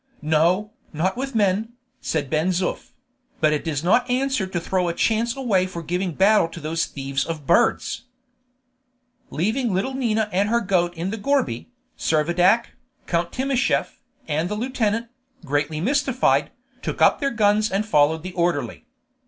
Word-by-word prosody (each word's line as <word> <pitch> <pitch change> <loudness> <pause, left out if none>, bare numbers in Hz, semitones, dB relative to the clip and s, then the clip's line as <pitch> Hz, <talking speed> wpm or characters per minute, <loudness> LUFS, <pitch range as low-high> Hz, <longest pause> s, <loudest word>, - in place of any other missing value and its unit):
"No, 170 +7 +2 0.2
not 175 +7 0
with 270 0 -4
men," 210 +2 +1 0.3
said 150 -3 -2
Ben 155 +4 0
Zoof; 185 0 -1 0.5
"but 155 -1 +3
it 150 - -1
does 155 -3 -2
not 225 +9 +3
answer 260 -4 0
to 185 -2 -2
throw 180 +1 -1
a 170 - -2
chance 230 +4 +1
away 210 -9 +1
for 170 -2 -7
giving 180 +2 -2
battle 195 +1 +4
to 165 +1 -10
those 160 +2 -1
thieves 135 0 -3
of 160 -2 -5
birds." 175 - +2 1.2
Leaving 220 - 0
little 195 +8 -1
Nina 220 -5 0
and 200 +3 +2
her 235 +1 +3
goat 180 -5 0
in 170 +4 -3
the 220 - -4
gourbi, 205 - 0 0.3
Servadac, 175 +8 +2 0.4
Count 170 0 -1
Timascheff, 265 0 0 0.3
and 155 +3 -1
the 210 - -2
lieutenant, 230 -1 -1 0.4
greatly 145 +2 -1
mystified, 260 - +1 0.3
took - - -4
up - - +5
their 275 - +1
guns 215 -2 +2
and 200 +2 -1
followed 155 -4 +2
the 185 0 -6
orderly. 175 +6 -1
185 Hz, 155 wpm, -23 LUFS, 165-230 Hz, 1.2 s, up